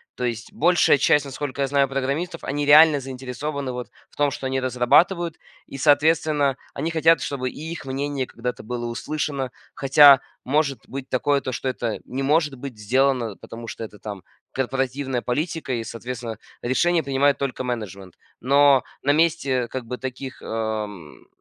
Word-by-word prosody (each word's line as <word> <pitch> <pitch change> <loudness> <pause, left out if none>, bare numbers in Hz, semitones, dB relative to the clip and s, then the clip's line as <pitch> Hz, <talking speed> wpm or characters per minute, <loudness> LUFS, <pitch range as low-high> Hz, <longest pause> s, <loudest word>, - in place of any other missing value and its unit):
То 125 - -5
есть 115 -2 -3
большая 175 -2 +4
часть, 145 +1 +3
насколько 140 0 -5
я 135 - +2
знаю, 140 0 +2
программистов, 140 +6 -3
они 145 +2 -1
реально 150 0 +7
заинтересованы 135 +1 -5
вот 125 0 -6 0.2
в - - -24
том, 145 -1 +2
что 135 - -4
они 130 0 -1
разрабатывают 160 +7 +2 0.3
и, 135 - -8
соответственно, 145 -1 +3 0.2
они 165 - -2
хотят, 165 0 +4
чтобы 130 -3 -2
и - - -11
их 170 - -7
мнение 135 0 -2
когда-то 125 0 -5
было 120 +1 -4
услышано. 135 +2 -3 0.2
Хотя, 140 0 +7 0.2
может 140 0 +1
быть, 135 0 -7
такое, 140 +2 +1
то 130 - -4
что 130 - -4
это 120 -4 -2
не 135 +2 -4
может 150 0 +2
быть 130 -2 -8
сделано, 125 0 +1
потому 115 +3 -10
что 115 - -6
это, 105 -2 -10
там, 100 -4 -7 0.3
корпоративная 135 0 -1
политика 150 +2 -2
и, 115 - -2
соответственно, 115 -1 -6 0.2
решение 165 +7 +2
принимает 140 +1 +2
только 130 -2 -3
менеджмент. 100 -7 -5 0.3
Но 140 +1 +5 0.2
на 140 - +2
месте 145 -6 +1
как 130 0 -6
бы 125 +2 -5
таких, 130 +2 -7
эм, 105 -7 -5
135 Hz, 165 wpm, -23 LUFS, 125-145 Hz, 0.3 s, реально